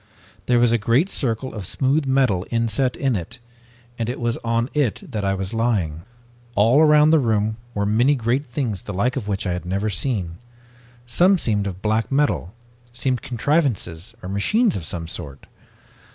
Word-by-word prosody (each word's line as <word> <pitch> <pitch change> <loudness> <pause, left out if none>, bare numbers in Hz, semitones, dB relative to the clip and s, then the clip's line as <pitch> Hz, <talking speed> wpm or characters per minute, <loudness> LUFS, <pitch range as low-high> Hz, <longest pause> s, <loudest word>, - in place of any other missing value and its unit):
There 125 - +4
was 120 -1 +4
a 120 - +2
great 125 - +2
circle 130 0 -1
of 105 -5 -5
smooth 135 +5 +1
metal 130 -9 +2
inset 115 +2 +1
in 135 -4 0
it, 100 +6 -5 0.6
and 115 0 -1
it 125 - -4
was 120 -1 0
on 115 +1 -1
it 145 -8 0
that 105 -4 -3
I 95 0 +1
was 95 +1 -4
lying. 100 -9 0 0.5
"All 115 +8 +5
around 150 0 +6
the 160 - +5
room 110 -3 0 0.2
were 100 -1 0
many 120 +8 +3
great 125 +3 0
things 120 -7 -3
the 100 - -7
like 120 +7 0
of 125 -7 -4
which 100 -1 -2
I 90 - 0
had 90 - -4
never 100 +4 -1
seen. 95 -7 -2 0.7
Some 180 +11 +4
seemed 105 - -1
of 95 0 -7
black 110 +3 0
metal, 140 -10 +1 0.4
seemed 125 0 -1
contrivances 115 - -1
or 90 - -5
machines 205 - +2
of 85 - -4
some 80 +1 -4
sort. 70 -4 -7
115 Hz, 180 wpm, -22 LUFS, 100-130 Hz, 0.7 s, around